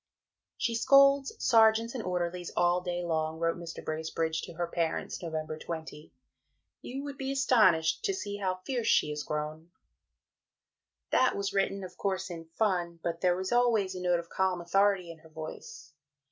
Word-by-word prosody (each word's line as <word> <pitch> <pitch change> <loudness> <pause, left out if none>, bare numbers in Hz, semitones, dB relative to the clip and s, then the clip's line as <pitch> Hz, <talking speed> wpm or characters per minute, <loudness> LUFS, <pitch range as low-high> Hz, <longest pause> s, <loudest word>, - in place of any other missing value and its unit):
"She 235 - 0
scolds 275 +3 +5
sergeants 225 -1 +4
and 255 - -3
orderlies 180 -1 -2
all 175 +1 +3
day 175 -1 -3
long," 160 -1 -1
wrote 165 0 0
Mr. 170 -1 -8
Bracebridge 160 0 -2
to - - -8
her 175 +1 -2
parents 170 -1 -2
(Nov. 165 -2 -5 0.2
20); 160 -2 -7 0.7
"you 270 +3 -6
would 285 -1 -7
be 270 0 -2
astonished 215 - +3
to 395 - +1
see 205 - -4
how 185 -2 -2
fierce 245 -4 -2
she 150 - +3
is 150 0 -3
grown." 150 +2 -4 1.4
That 255 - +3
was 200 0 -2
written, 195 0 0
of 180 -1 -9
course, 190 -2 -2
in 165 -1 -7
fun; 175 -1 -1
but 170 -1 -3
there 180 -1 +3
was 190 0 -3
always 235 -6 +2
a 185 - -6
note 175 -1 +2
of 170 - -8
calm 185 0 0
authority 190 0 +2
in 165 - -13
her 160 - -17
voice. 155 -1 -9
180 Hz, 170 wpm, -30 LUFS, 165-210 Hz, 1.4 s, scolds